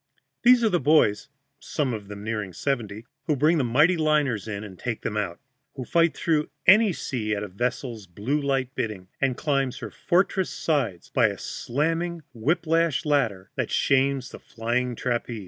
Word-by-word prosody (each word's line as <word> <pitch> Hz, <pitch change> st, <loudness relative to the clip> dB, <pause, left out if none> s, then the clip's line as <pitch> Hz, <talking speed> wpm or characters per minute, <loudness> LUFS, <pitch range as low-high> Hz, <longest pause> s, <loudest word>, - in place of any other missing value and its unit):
These 245 Hz, 0 st, +6 dB
are 220 Hz, -, +4 dB
the 175 Hz, -, +2 dB
boys 135 Hz, -8 st, +3 dB, 0.3 s
(some 140 Hz, -5 st, -2 dB
of 105 Hz, -3 st, -6 dB
them 100 Hz, 0 st, -8 dB
nearing 105 Hz, -4 st, -3 dB
seventy) 115 Hz, -, -3 dB, 0.2 s
who 155 Hz, -, +2 dB
bring 155 Hz, +4 st, +3 dB
the -, -, +2 dB
mighty 150 Hz, +9 st, +3 dB
liners 150 Hz, -, +1 dB
in 100 Hz, -1 st, -4 dB
and 95 Hz, -4 st, -10 dB
take 120 Hz, -3 st, -4 dB
them 105 Hz, -, -3 dB
out, 100 Hz, -5 st, -2 dB, 0.4 s
who 130 Hz, -, -5 dB
fight 170 Hz, +3 st, +2 dB
through 155 Hz, -3 st, +1 dB, 0.2 s
any 210 Hz, +3 st, +7 dB
sea 110 Hz, -9 st, -2 dB
at 100 Hz, -, -3 dB
a -, -, -4 dB
vessel's 120 Hz, +1 st, -3 dB
blue 110 Hz, -, -2 dB
light 135 Hz, -2 st, -1 dB
bidding, 95 Hz, -5 st, -4 dB
and 135 Hz, -3 st, +1 dB
climb 140 Hz, -3 st, 0 dB
her 110 Hz, -5 st, -7 dB
fortress 185 Hz, +1 st, +1 dB
sides 140 Hz, -, -2 dB
by -, -, +4 dB
a -, -, -4 dB
slamming 165 Hz, +5 st, -2 dB
whip 155 Hz, +9 st, 0 dB
lash 165 Hz, -1 st, +1 dB
ladder 115 Hz, -11 st, 0 dB
that -, -, -2 dB
shames 135 Hz, -1 st, +1 dB
the -, -, -9 dB
flying 120 Hz, +2 st, -2 dB
trapeze. 120 Hz, -1 st, -2 dB
130 Hz, 180 wpm, -25 LUFS, 110-155 Hz, 0.4 s, any